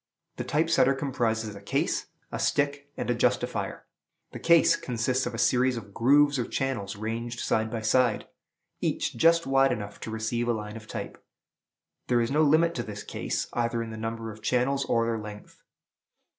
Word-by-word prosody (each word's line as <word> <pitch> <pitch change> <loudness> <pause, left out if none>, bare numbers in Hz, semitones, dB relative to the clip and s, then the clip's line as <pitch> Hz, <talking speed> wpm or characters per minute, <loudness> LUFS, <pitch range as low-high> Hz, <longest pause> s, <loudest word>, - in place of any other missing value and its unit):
The - - -2
Type 155 +2 +1
setter 135 -4 +4
comprises 115 -6 -1
a 100 - -10
case, 100 - -1 0.2
a - - -4
stick, 145 0 0
and - - -3
a - - +3
justifier. 120 - -1 0.5
The - - -7
case 170 -1 +5
consists 125 +1 -1
of 120 - -4
a - - -5
series 125 +2 +2
of 100 -3 -9
grooves 140 +4 +4
or 120 - 0
channels 115 -9 -2
ranged 115 +3 -4
side 110 0 0
by 115 0 -4
side, 125 +4 +2 0.5
each - - -1
just 165 +1 +4
wide 135 0 +4
enough 100 -1 -5
to - - -6
receive 110 +2 -2
a 120 - +2
line 105 -1 -5
of 110 -1 -10
type. - - -7 0.8
There 120 -1 +3
is 115 +1 0
no 150 +2 +3
limit 160 +3 +4
to 120 - -1
this 105 -2 -7
case, - - -3
either 115 -1 0
in 115 - -7
the - - -6
number 115 0 -4
of 110 +1 -13
channels, 130 +4 +1
or 115 0 +2
their 115 -1 -1
length. 105 -1 -10
120 Hz, 185 wpm, -27 LUFS, 110-135 Hz, 0.8 s, case